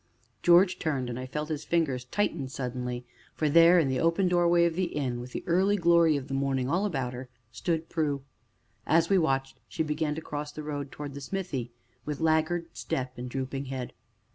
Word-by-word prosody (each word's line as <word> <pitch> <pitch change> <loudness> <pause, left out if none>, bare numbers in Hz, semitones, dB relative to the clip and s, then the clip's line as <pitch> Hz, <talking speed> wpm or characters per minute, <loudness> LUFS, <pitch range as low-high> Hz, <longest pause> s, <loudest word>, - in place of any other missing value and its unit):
George 180 +2 +5
turned, 135 -6 -1
and 120 - -5
I 130 - -5
felt 150 +3 -4
his 155 -2 -3
fingers 140 -7 0
tighten 160 -3 -1
suddenly, 125 -2 -4 0.3
for 155 - 0
there, 170 +3 +7
at 160 -5 +4
the 130 -1 0
open 165 +3 +2
doorway 175 -1 +4
of 170 - +1
the 185 +2 0
inn, 130 -5 -1
with 125 +1 -8
the - - -5
early 190 +3 +3
glory 170 -3 +4
of 135 -1 -6
the 135 - -5
morning 135 -2 0
all 185 +8 +1
about 135 -9 -2
her, 125 +1 -7 0.2
stood 160 +8 -2
Prue. 145 -4 -1 0.6
As 165 +3 +3
we 195 - +5
watched, 135 -4 0
she - - -2
began 150 0 -1
to - - -3
cross 145 -1 -5
the 155 - -7
road 145 -2 -4
towards 145 -1 -7
the 140 - -7
smithy, 140 -7 -4 0.3
with 150 +1 -4
laggard 160 +1 +2
step 130 -1 -3
and 125 +1 -5
drooping 135 +1 -3
head. 130 -2 -5
150 Hz, 200 wpm, -28 LUFS, 130-170 Hz, 0.6 s, there